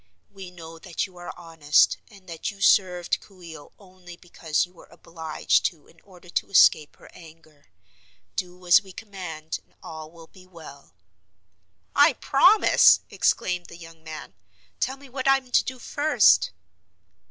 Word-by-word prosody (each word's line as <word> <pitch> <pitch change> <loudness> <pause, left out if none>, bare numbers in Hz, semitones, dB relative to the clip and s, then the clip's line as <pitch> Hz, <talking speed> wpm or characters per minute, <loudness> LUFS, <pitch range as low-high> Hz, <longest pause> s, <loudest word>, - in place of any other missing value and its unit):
"We 195 -2 -10
know 165 -2 -12
that 175 0 -4
you 185 -3 -16
are 175 - -8
honest 160 -4 +2
and 195 -3 -19
that 165 -2 -5
you 200 -2 -11
served 180 -3 +2
Coo 185 -3 -19
ee 165 -1 -10
oh 145 - -14
only 185 -3 -15
because 170 -3 -2
you 180 - -24
were 175 - -18
obliged 160 -2 -2
to 160 -4 -3
in 165 - -24
order 180 -3 -19
to 175 - -3
escape 155 -6 +4
her - - -18
anger. 155 -3 -18 0.7
Do 180 0 -6
as 175 +2 +6
we 190 -2 -15
command 180 -7 -7
and - - -36
all 160 -1 -9
will 165 0 -15
be 185 +2 -19
well." 155 - -14 1.0
"I 290 +1 +5
promise!" 360 - +4
exclaimed 180 -1 -1
the 170 - -13
young 165 -1 -14
man. 155 -1 -9 0.5
"Tell 265 +2 -2
me 280 0 -15
what 260 +1 -5
I 270 0 +5
am 260 -2 -13
to - - +4
do 260 - -6
first." 290 +5 +2
175 Hz, 165 wpm, -24 LUFS, 160-195 Hz, 1.0 s, as